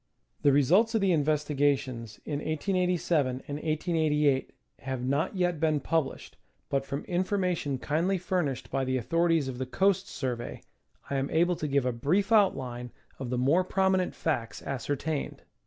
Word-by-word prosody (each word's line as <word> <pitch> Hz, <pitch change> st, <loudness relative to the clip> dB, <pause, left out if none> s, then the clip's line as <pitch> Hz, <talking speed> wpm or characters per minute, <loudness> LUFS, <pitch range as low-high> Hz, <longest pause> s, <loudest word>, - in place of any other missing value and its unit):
The 145 Hz, -, +5 dB
results 185 Hz, -, +4 dB
of 220 Hz, -, +2 dB
the 195 Hz, -1 st, +3 dB
investigations 145 Hz, -6 st, 0 dB
in 145 Hz, -2 st, -2 dB
1887 175 Hz, -1 st, +1 dB, 0.2 s
and 145 Hz, -, -4 dB
1888 155 Hz, -3 st, +1 dB, 0.3 s
have 130 Hz, -2 st, -4 dB
not 140 Hz, +8 st, 0 dB
yet 175 Hz, -3 st, 0 dB
been 155 Hz, -2 st, +2 dB
published, 160 Hz, 0 st, -2 dB, 0.3 s
but 135 Hz, 0 st, 0 dB
from 140 Hz, +1 st, -3 dB
information 180 Hz, -6 st, 0 dB
kindly 165 Hz, +8 st, 0 dB
furnished 175 Hz, -7 st, -2 dB
by 135 Hz, -, 0 dB
the 130 Hz, 0 st, 0 dB
authorities 165 Hz, +3 st, +1 dB
of 130 Hz, -2 st, -5 dB
the 130 Hz, -, -3 dB
Coast 195 Hz, +6 st, +2 dB
Survey, 125 Hz, -, -4 dB, 0.5 s
I 140 Hz, -, +1 dB
am 135 Hz, +1 st, -1 dB
able 175 Hz, +2 st, +2 dB
to 155 Hz, -, -3 dB
give 140 Hz, -2 st, +1 dB
a 125 Hz, -, +2 dB
brief 160 Hz, -, 0 dB
outline 130 Hz, -, +2 dB, 0.3 s
of 130 Hz, -2 st, -4 dB
the 125 Hz, -, -1 dB
more 145 Hz, +9 st, +3 dB
prominent 190 Hz, 0 st, +1 dB
facts 120 Hz, -8 st, -2 dB
ascertained. 140 Hz, +3 st, -3 dB
150 Hz, 155 wpm, -28 LUFS, 135-180 Hz, 0.5 s, The